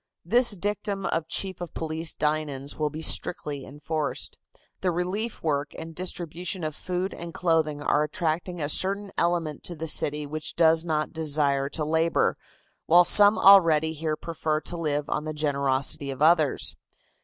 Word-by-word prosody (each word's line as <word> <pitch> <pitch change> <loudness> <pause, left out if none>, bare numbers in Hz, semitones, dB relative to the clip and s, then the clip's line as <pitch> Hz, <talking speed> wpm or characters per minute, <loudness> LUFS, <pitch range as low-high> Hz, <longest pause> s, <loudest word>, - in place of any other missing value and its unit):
This 240 +3 +5
dictum 200 0 -3
of 165 -1 -2
Chief 190 -2 0
of 175 - -7
Police 160 0 -2
Dinan's 150 -2 -2
will 150 -1 -1
be 155 +2 -7
strictly 145 -4 +1
enforced. 150 +1 -4 0.4
The 185 - 0
relief 185 +6 -3
work 145 -2 -2
and 165 0 -8
distribution 175 +1 -4
of 155 -1 -4
food 185 +3 -4
and 170 -1 -8
clothing 160 -4 0
are 145 - +2
attracting 170 +3 -2
a 145 - -2
certain 195 +5 -1
element 170 -4 -1
to 175 - -4
the 160 +1 -6
city 150 -1 +1
which 155 +2 -5
does 165 -1 +4
not 155 -2 -2
desire 145 -3 +1
to 150 0 -1
labor, 160 +2 +1 0.5
while 175 +2 +6
some 205 +4 +6
already 165 -5 +5
here 155 0 -3
prefer 155 -1 -3
to 175 - -5
live 150 -3 -2
on 150 - -3
the 155 - -4
generosity 140 -2 0
of 135 - -6
others. 160 -2 +3
160 Hz, 160 wpm, -25 LUFS, 150-175 Hz, 0.5 s, while